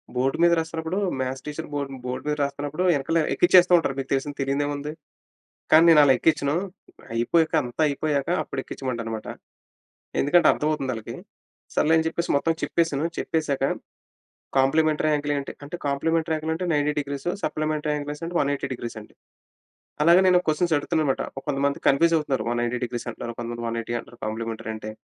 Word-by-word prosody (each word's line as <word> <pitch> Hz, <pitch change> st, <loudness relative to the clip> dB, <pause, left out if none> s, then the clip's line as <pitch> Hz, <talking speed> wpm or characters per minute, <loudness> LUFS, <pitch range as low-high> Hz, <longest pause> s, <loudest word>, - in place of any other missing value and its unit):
Board 130 Hz, +2 st, +1 dB
మీద 170 Hz, -, +6 dB
రాస్తున్నప్పుడు 160 Hz, +2 st, -3 dB, 0.2 s
maths 130 Hz, 0 st, -3 dB
teacher 150 Hz, 0 st, -5 dB
board 145 Hz, -1 st, -3 dB
board 125 Hz, +2 st, -5 dB
మీద 150 Hz, -, +1 dB
రాస్తున్నప్పుడు 145 Hz, +4 st, -2 dB
వెనకాల 165 Hz, +2 st, +1 dB
ఎక్కిచ్చేస్తూ 180 Hz, 0 st, +5 dB
ఉంటారు. 150 Hz, -5 st, -1 dB
మీకు 135 Hz, -1 st, -4 dB
తెలిసిందే, 140 Hz, +2 st, -1 dB
తెలీనిదేముంది. 145 Hz, +2 st, -1 dB, 0.8 s
కానీ, 160 Hz, +1 st, +8 dB
నేను 155 Hz, -2 st, +7 dB
అలా 135 Hz, -, +6 dB
ఎక్కించను. 145 Hz, -1 st, +2 dB, 0.6 s
అయిపోయాక 155 Hz, +9 st, +2 dB
అంతా 125 Hz, +5 st, -3 dB
అయిపోయాక 145 Hz, 0 st, -1 dB
అప్పుడు 135 Hz, -, -5 dB
ఎక్కించమంటానన్నమాట. 115 Hz, -5 st, -5 dB, 0.9 s
ఎందుకంటే, 165 Hz, +4 st, +4 dB
అర్థమవుతుందాళ్ళకి. 135 Hz, -7 st, -2 dB, 0.6 s
సర్లే 160 Hz, -, +3 dB
అని 160 Hz, -, +1 dB
చెప్పేసి 170 Hz, +1 st, -2 dB
మొత్తం 165 Hz, +3 st, +1 dB
చెప్పేసాను. 165 Hz, -3 st, 0 dB
చెప్పేసాక, 150 Hz, -4 st, -1 dB, 1.0 s
కాంప్లిమెంటరీ 155 Hz, +3 st, +3 dB
యాంగిల్ 145 Hz, 0 st, -1 dB
ఏంటి? 140 Hz, -, -5 dB
అంటే 145 Hz, +5 st, -6 dB
కాంప్లిమెంటరీ 160 Hz, +3 st, 0 dB
యాంగిల్ 160 Hz, +1 st, -2 dB
అంటె 180 Hz, +3 st, -3 dB
90 145 Hz, 0 st, +1 dB
డీగ్రీస్, 140 Hz, +2 st, -3 dB, 0.2 s
సప్లిమెంటరీ 155 Hz, 0 st, -1 dB
యాంగిల్ 150 Hz, +4 st, -5 dB
180 140 Hz, 0 st, -1 dB
డిగ్రీస్ 120 Hz, -1 st, -7 dB
అని. 105 Hz, -, -15 dB, 0.9 s
అలాగే 170 Hz, +4 st, +7 dB
నేను 180 Hz, -1 st, +6 dB
క్వెషన్స్ 165 Hz, +2 st, +1 dB
అడుగుతున్నానన్నమాట. 145 Hz, -2 st, 0 dB, 0.2 s
కొంతమంది 140 Hz, 0 st, 0 dB
కన్‌‌ఫ్యూస్ 165 Hz, +5 st, +4 dB
అవుతున్నారు. 145 Hz, -4 st, -2 dB
190 120 Hz, +1 st, -1 dB
డిగ్రీస్ 120 Hz, 0 st, -5 dB
అంటున్నారు. 120 Hz, 0 st, -5 dB
ఆహ్, -, -, -46 dB
కొంతమంది 120 Hz, 0 st, -5 dB
180 115 Hz, 0 st, -3 dB
అంటారు, 120 Hz, -, -16 dB
కాంప్లిమెంటరీ 110 Hz, 0 st, -4 dB
అంటే, 110 Hz, 0 st, -7 dB
145 Hz, 150 wpm, -24 LUFS, 130-160 Hz, 1.0 s, కానీ